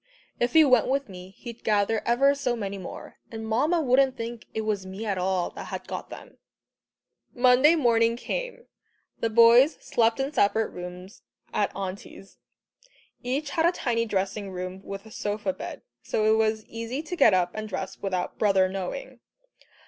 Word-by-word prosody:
"If 240 0 0
he 320 -1 +7
went 255 -5 +4
with 275 -2 -1
me, 180 -1 -10
he'd 235 -1 -10
gather 210 +1 +1
ever 270 +4 +4
so 265 -4 -1
many 200 -3 -4
more, 185 - -9
and 225 -1 -6
Mamma 300 +9 +1
wouldn't 260 0 +3
think 230 0 -6
it 220 - -3
was 210 -3 -1
me 190 +4 -7
at 200 -3 -1
all 185 -1 0
that - - -8
had - - -7
got - - -6
them." - - -11 1.0
Monday 255 +5 +5
morning 230 -5 +3
came. - - -5 0.5
The 230 - 0
boys 235 +6 +6
slept 230 +1 +1
in 270 +2 -2
separate 220 0 +2
rooms 180 +2 -9 0.3
at - - +1
Auntie's. 195 0 -8 0.8
Each 275 +4 -2
had 325 0 +2
a - - +4
tiny 230 -8 -1
dressing 195 0 -2
room 185 0 -6
with 195 +1 -7
a 220 - -13
sofa 210 +6 -2
bed, - - -8 0.2
so 215 - -1
it 220 0 +5
was 220 -1 +1
easy 230 +6 -5
to 340 +3 -5
get 225 - +5
up 180 -1 +1
and 215 0 -5
dress 190 -1 -5
without 185 -2 -3
"brother" 195 -3 +4
knowing. 195 +7 -6
225 Hz, 170 wpm, -26 LUFS, 195-255 Hz, 1.0 s, he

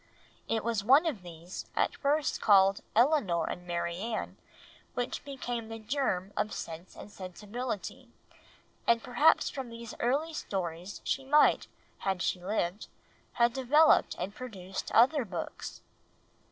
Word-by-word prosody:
It 225 - 0
was 230 -3 0
one 275 +9 +6
of 280 - -1
these, 175 0 -9
at - - +1
first 295 +1 0
called 195 -1 +5
Elinor 230 - +3
and 180 0 -6
Marianne, 175 +6 -3 0.6
which 245 -1 -2
became 245 -5 -4
the 225 - -5
germ 215 -5 -1
of 215 - -1
Sense 165 +2 -7
and 210 - -10
Sensibility, 205 +4 -6 0.8
and 230 -1 +4
perhaps 295 +6 +4
from 265 -3 -5
these 230 -1 -8
early 290 +7 0
stories 180 - -4
she 270 - -1
might, 295 +3 +4 0.3
had 190 -3 -1
she 180 - -1
lived, 195 -1 -2 0.5
have 235 0 +3
developed 285 +5 +4
and 190 +3 -4
produced 195 -6 -6
other 265 +4 +5
books. 180 -6 -6
220 Hz, 130 wpm, -30 LUFS, 185-260 Hz, 0.8 s, one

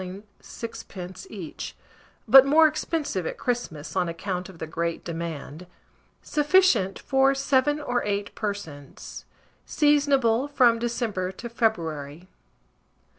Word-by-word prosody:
6d. 190 - -8
each, - - -7 0.5
but 265 +4 +10
more 305 +4 +5
expensive 305 - -2
at - - -5
Christmas, 190 - -3
on 180 -2 +1
account 180 +2 -4
of 185 - -13
the 160 - -5
great 170 +1 -3
demand. 165 0 -6 0.6
Sufficient 295 - +3
for 270 0 +2
7 275 +2 +2
or 245 -4 -1
8 205 0 -2
persons. 180 -10 -7 0.4
Seasonable 280 -4 +3
from 245 -5 +4
December 230 -6 -2
to 235 - -7
February. 165 - -2
220 Hz, 110 wpm, -25 LUFS, 175-270 Hz, 0.6 s, but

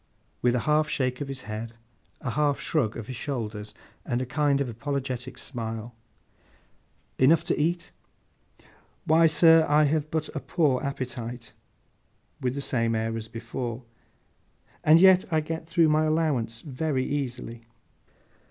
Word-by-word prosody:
With 125 0 +3
a 125 - +1
half 150 0 +2
shake 130 -2 -1
of 145 - -3
his 135 -2 -5
head, 110 +2 -6 0.5
a 130 - -3
half 145 +1 +1
shrug 125 -9 0
of 115 - -6
his 130 - -6
shoulders, 110 -5 -5 0.3
and 120 - -1
a 130 - -2
kind 140 +1 +1
of 140 - 0
apologetic 130 0 -4
smile. 115 -2 -6 1.3
'Enough 145 +5 +5
to - - 0
eat?' 170 +3 -1 1.1
'Why, 165 +1 +5
sir, 165 0 +6
I 150 +1 +5
have 150 +1 +1
but 155 -1 -1
a - - -1
poor 145 -5 +1
appetite,' 125 -4 -5 0.9
with 125 0 -1
the 140 - -3
same 115 -4 0
air 110 0 -1
as 110 -1 -5
before; 115 +1 -5 1.0
'and 155 +2 +7
yet 190 0 +6
I 160 - +3
get 160 +1 -5
through 165 -1 +3
my 155 +1 +3
allowance 145 -8 0
very 135 -1 -2
easily. 125 -5 -4
135 Hz, 145 wpm, -26 LUFS, 120-155 Hz, 1.3 s, and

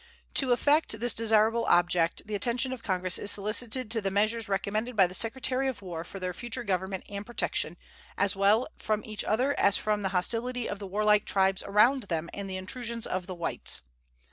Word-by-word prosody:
To 265 -3 +1
effect 285 -2 +2
this 240 0 +3
desirable 225 +1 +2
object 175 -1 +2
the 215 - -7
attention 245 +5 0
of 250 - -8
Congress 185 -3 0
is 205 - -3
solicited 215 +4 0
to 225 -1 +2
the 195 - 0
measures 215 +3 +1
recommended 215 +5 -1
by 195 -3 +6
the 180 - -6
Secretary 255 +5 0
of 245 -6 -4
War 170 -3 -5
for 195 +3 -8
their 185 -1 -3
future 240 +5 -4
government 190 0 -2
and 200 0 -6
protection, 240 +3 -2 0.4
as 200 0 +2
well 205 +5 +3
from 215 -1 -1
each 215 -1 -4
other 255 +6 +1
as 200 0 +5
from 210 -1 0
the 195 - -1
hostility 230 +6 0
of 205 - -5
the 200 - -6
warlike 210 +1 +2
tribes 190 -1 +2
around 235 +7 +3
them 170 -3 -3
and 200 -1 -5
the 185 - -3
intrusions 230 +4 -4
of 185 -1 -3
the 185 - -5
whites. 170 - -4
210 Hz, 195 wpm, -28 LUFS, 190-235 Hz, 0.4 s, by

